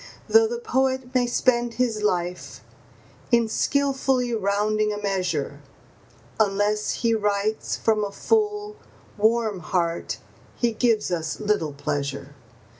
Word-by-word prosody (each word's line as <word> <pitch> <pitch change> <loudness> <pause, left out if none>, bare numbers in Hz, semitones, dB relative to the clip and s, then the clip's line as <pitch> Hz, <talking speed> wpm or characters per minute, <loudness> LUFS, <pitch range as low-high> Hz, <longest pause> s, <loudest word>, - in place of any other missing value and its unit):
Though 450 0 +6
the 475 +1 -3
poet 265 - -1
may 250 -1 +2
spend 240 -1 +1
his 235 -4 0
life 180 -3 -2 0.7
in 235 -1 +4
skilfully 265 0 +1
rounding 210 +1 +1
a 205 - -3
measure, 195 -3 -2 0.8
Unless 210 0 +1
he 230 - +4
writes 210 0 0
from 215 -2 +1
a 200 - -3
full, 420 - 0 0.4
warm 220 -1 +1
heart 170 0 -1 0.4
he 240 -1 +1
gives 225 -3 +1
us 160 -2 -2
little 205 -8 0
pleasure. 140 0 -4
215 Hz, 115 wpm, -24 LUFS, 200-250 Hz, 0.8 s, Though